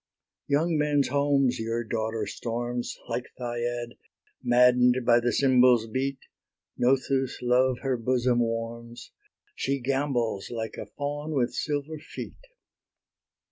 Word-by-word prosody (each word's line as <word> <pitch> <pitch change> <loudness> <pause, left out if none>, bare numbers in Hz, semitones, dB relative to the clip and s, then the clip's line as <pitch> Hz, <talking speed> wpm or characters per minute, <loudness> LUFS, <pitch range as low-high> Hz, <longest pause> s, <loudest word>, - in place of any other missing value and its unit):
Young 155 +3 +1
men's 145 -2 +2
homes 140 -3 +2
your 115 +1 -2
daughter 110 0 -2
storms, 120 +1 -4
Like 120 +2 -3
Thyiad, 120 -1 -3 0.4
madden'd 125 0 +4
by 120 0 +5
the 120 0 0
cymbals' 125 -4 +4
beat: 130 +4 -2 0.6
Nothus' 130 +1 +1
love 125 +1 +3
her 130 -2 0
bosom 125 +1 +1
warms: 115 0 -4 0.4
She 140 - -1
gambols 125 -6 -1
like 115 -1 -4
a 110 - -6
fawn 145 +6 -4
with 125 -3 +1
silver 150 +1 -3
feet. - - -9
125 Hz, 115 wpm, -27 LUFS, 120-140 Hz, 0.6 s, by